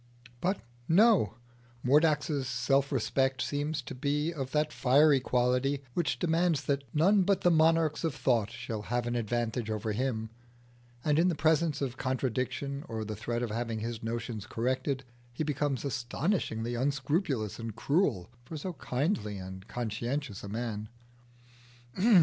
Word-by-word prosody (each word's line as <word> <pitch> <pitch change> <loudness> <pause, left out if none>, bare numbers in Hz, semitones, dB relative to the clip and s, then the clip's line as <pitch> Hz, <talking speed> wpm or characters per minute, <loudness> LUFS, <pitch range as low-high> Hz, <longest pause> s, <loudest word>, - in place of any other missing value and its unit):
But 190 +3 0 0.3
no: 200 - +5 0.5
Mordax's 145 0 +3
self 135 +3 +1
respect 135 +1 +1
seems 145 +1 -1
to - - -7
be 150 +5 0
of 135 -5 -4
that 150 +1 0
fiery 140 +2 +5
quality 125 +3 +1
which 170 -4 0
demands 165 -3 +2
that 140 0 0
none 190 +7 +4
but 195 +1 +2
the 175 - +4
monarchs 160 -1 +3
of 160 -5 0
thought 120 -6 +2
shall 115 -2 -5
have 120 +2 -1
an 120 0 -1
advantage 120 0 -1
over 110 0 -2
him, 110 -1 -2 0.7
and 150 0 +3
in 175 - +4
the 175 - +1
presence 160 0 +2
of 130 -1 -3
contradiction 130 +2 -2
or 110 -1 -3
the 110 0 -4
threat 120 +3 -2
of 115 - -2
having 115 0 -2
his 115 0 -4
notions 115 -2 -4
corrected, 130 +3 -1 0.3
he 125 +6 -3
becomes 145 -2 -1
astonishingly 130 - -1
unscrupulous 135 - 0
and 115 -2 -5
cruel 140 - +1
for 155 +6 -7
so 180 +5 -4
kindly 125 - -1
and 95 +1 -8
conscientious 120 +1 -3
a 100 - -6
man. 110 -1 -3
130 Hz, 145 wpm, -30 LUFS, 115-150 Hz, 0.7 s, no